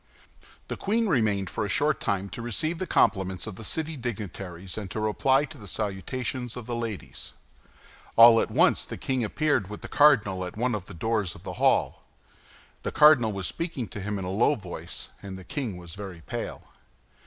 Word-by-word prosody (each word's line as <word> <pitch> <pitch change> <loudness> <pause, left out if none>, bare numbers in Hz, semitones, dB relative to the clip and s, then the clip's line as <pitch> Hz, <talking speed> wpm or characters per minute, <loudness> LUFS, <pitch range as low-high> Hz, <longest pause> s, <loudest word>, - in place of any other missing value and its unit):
The - - -3
queen 225 +3 +1
remained 105 - +2
for - - -2
a - - -2
short - - +2
time 100 0 -1
to 115 - -7
receive 155 - -1
the 185 - -2
compliments 95 -3 +2
of - - -6
the 110 - -9
city 160 +8 -1
dignitaries 95 - -5
and 105 -3 -5
to 110 - -4
reply 130 +6 +2
to 135 - -12
the 105 - -10
salutations 115 - -3
of 120 - -6
the 120 0 -3
ladies. 115 -4 -5 0.8
All 115 0 +9
at - - -2
once - - +4
the - - -6
king 130 -2 -1
appeared 130 -3 +1
with 105 - -7
the - - -7
cardinal 110 -11 +4
at 90 +3 -7
one 120 +2 +1
of 105 -4 -3
the 100 - -9
doors 105 -1 -1
of - - -14
the - - -5
hall. - - +3 0.8
The - - -3
cardinal 145 -7 +6
was 100 -2 -3
speaking 165 - -3
to 105 - -7
him 105 +1 -2
in 95 - -4
a 90 - -3
low 115 +9 +3
voice, 95 -7 -6
and 95 -1 -7
the 95 - -10
king 115 -2 -4
was 85 -2 -9
very 95 -4 -8
pale. - - -5
110 Hz, 200 wpm, -27 LUFS, 95-130 Hz, 0.8 s, All